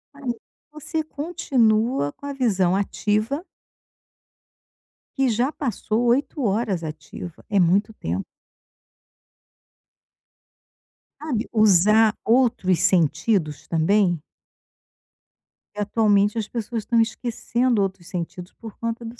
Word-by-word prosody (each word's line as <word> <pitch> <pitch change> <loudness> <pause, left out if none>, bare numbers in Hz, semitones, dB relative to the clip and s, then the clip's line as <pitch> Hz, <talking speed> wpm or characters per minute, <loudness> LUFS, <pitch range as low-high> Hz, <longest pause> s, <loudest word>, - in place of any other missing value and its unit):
Ai, 280 -3 -6 0.4
você 310 +1 -4
continua 255 - 0
com - - -13
a 285 - -3
visão 195 -9 +1
ativa 215 - -1 1.7
que 270 -2 +3
já 240 +4 +1
passou 240 -4 -2
8 270 +3 +1
horas 205 -4 0
ativa. 155 +2 -8
É 205 - +1
muito 195 +5 +3
tempo. 90 - -4 3.0
Sabe, 265 -8 -2
usar 215 +1 +5
outros 230 -7 +2
sentidos 165 -1 +1
também. 175 +1 +2 1.5
Porque 210 - -3
atualmente 205 -1 +3
as 215 - -2
pessoas 230 -1 -4
estão 230 +1 +2
esquecendo 235 0 0
outros 190 -3 -3
sentidos 180 0 -6
por 225 -3 -11
conta 230 +1 -4
do 230 +1 -9
215 Hz, 100 wpm, -23 LUFS, 190-245 Hz, 3.0 s, usar